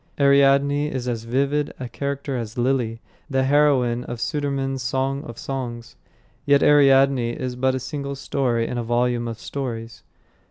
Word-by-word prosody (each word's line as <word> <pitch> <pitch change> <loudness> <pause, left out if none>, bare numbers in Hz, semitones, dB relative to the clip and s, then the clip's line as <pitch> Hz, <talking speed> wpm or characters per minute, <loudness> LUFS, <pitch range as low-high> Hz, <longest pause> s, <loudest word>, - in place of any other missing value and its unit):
Ariadne 140 +1 +4
is 130 -4 -4
as 115 -2 -3
vivid 140 +4 0
a 130 - -4
character 140 +1 -4
as 115 -2 -5
Lilly, 120 -2 0 0.3
the 135 -1 +1
heroine 130 -4 +3
of 120 - -6
Sudermann's 135 -1 -2
Song 135 +3 -1
of 120 - -9
Songs; 120 -4 -5 0.5
yet 140 -1 +4
Ariadne 135 -4 +5
is 125 0 -4
but 130 +1 +1
a - - -2
single 140 +1 -5
story 125 -4 -1
in 120 - -3
a - - -2
volume 120 0 0
of 115 -1 -5
stories. 115 -4 -6
130 Hz, 155 wpm, -23 LUFS, 120-140 Hz, 0.5 s, Ariadne